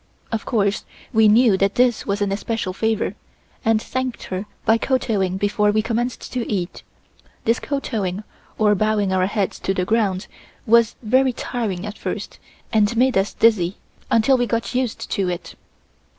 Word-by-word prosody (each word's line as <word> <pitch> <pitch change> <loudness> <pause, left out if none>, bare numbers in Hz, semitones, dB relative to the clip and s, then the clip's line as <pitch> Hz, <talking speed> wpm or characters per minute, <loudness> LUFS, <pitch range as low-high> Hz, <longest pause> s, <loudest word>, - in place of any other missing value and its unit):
Of 225 -2 -2
course, 205 -2 +1 0.3
we 220 -1 +5
knew 220 -1 +5
that 195 +1 +1
this 245 -2 +2
was 200 0 0
an 200 - -1
especial 205 -1 -2
favor, 220 +2 0 0.5
and 225 -1 +3
thanked 255 +2 -4
her 190 +2 -5 0.2
by 225 +1 +4
kowtowing 210 -9 0
before 205 +1 +1
we 215 +1 +2
commenced 240 +2 -3
to 245 -3 -2
eat. 185 -4 -3 0.6
This 230 +2 +2
kowtowing, 215 -9 -3 0.3
or 210 -1 +4
bowing 210 -1 +1
our 185 0 +2
heads 200 -1 -2
to 195 - -1
the 180 - 0
ground, 205 -3 +1 0.4
was 230 0 +4
very 260 +3 +3
tiring 220 -7 -3
at 210 0 -7
first - - -5 0.3
and 215 +1 +3
made 255 +1 +3
us 195 +2 +2
dizzy, 200 -5 +3 0.3
until 245 +3 +4
we 245 - +1
got 230 +1 -2
used 250 -2 -2
to 190 -2 0
it. 175 -1 -5
215 Hz, 165 wpm, -21 LUFS, 195-235 Hz, 0.6 s, we